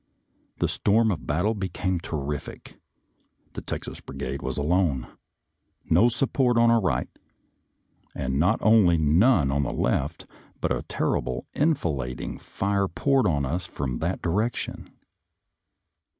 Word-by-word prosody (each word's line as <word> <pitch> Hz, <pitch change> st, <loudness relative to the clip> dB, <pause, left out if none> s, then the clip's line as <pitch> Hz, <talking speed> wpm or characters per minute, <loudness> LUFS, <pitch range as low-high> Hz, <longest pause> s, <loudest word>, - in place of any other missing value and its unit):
The -, -, +1 dB
storm 110 Hz, +2 st, +2 dB
of 85 Hz, -5 st, -5 dB
battle 90 Hz, +9 st, +1 dB
became 95 Hz, -2 st, -2 dB
terrific. 75 Hz, -3 st, -6 dB, 0.7 s
The -, -, -6 dB
Texas -, -, -6 dB
Brigade 70 Hz, +1 st, -5 dB
was 65 Hz, -1 st, -4 dB
alone; 75 Hz, -4 st, +1 dB, 0.9 s
no 120 Hz, -, +6 dB
support 125 Hz, 0 st, +1 dB
on 115 Hz, 0 st, +5 dB
our 115 Hz, -1 st, +4 dB
right, 70 Hz, -10 st, 0 dB, 1.1 s
and 65 Hz, +1 st, -2 dB
not 90 Hz, +8 st, +3 dB
only 105 Hz, -6 st, +5 dB
none 80 Hz, -, +4 dB
on 70 Hz, +1 st, +1 dB
the 70 Hz, -, -2 dB
left, -, -, -1 dB, 0.3 s
but -, -, -1 dB
a -, -, -3 dB
terrible 60 Hz, 0 st, -2 dB
enfilading 75 Hz, -, -1 dB
fire 100 Hz, 0 st, -1 dB
poured 130 Hz, +8 st, +2 dB
on 70 Hz, -5 st, +1 dB
us 85 Hz, +6 st, -3 dB
from 65 Hz, -7 st, -4 dB
that 85 Hz, +4 st, -2 dB
direction. 105 Hz, +8 st, -2 dB
85 Hz, 125 wpm, -25 LUFS, 70-110 Hz, 1.1 s, no